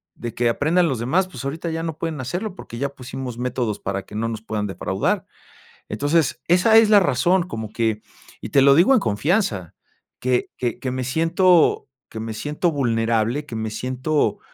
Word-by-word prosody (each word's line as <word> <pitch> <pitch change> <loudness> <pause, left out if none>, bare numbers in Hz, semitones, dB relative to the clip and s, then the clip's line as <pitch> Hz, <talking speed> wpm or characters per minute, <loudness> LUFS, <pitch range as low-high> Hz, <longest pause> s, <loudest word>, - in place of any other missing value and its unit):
de 120 -1 -6
que 120 0 +1
aprendan 165 +8 +2
los 130 -5 -2
demás, 170 +11 +1
pues, 185 - -9
ahorita 160 +5 -3
ya 165 0 -3
no 160 -2 -4
pueden 160 -4 -3
hacerlo, 180 - -4
porque 115 - -9
ya 140 +1 -1
pusimos 130 -2 -7
métodos 120 -4 -2
para 95 0 -3
que - - -15
no 115 +2 -1
nos 110 -2 -5
puedan 105 -2 -3
defraudar. 95 - -1 0.6
Entonces, 145 +3 0
esa 180 +6 +5
es 225 -1 +6
la 210 -2 +7
razón, 175 +4 +2
como 110 -9 -5
que, 110 -2 -1 0.4
y - - -6
te 140 - +4
lo 140 0 +6
digo 175 - +5
en 250 - +4
confianza, 105 - 0 0.5
que 125 -1 0
que 120 -3 -2
que 130 - -3
me 130 0 -3
siento 165 +5 +3 0.2
que 110 - -7
me 110 0 -4
siento 150 +9 -1
vulnerable, 115 0 0
que 120 - -8
me 110 0 -3
siento, 130 +6 -1
130 Hz, 190 wpm, -22 LUFS, 115-165 Hz, 0.6 s, la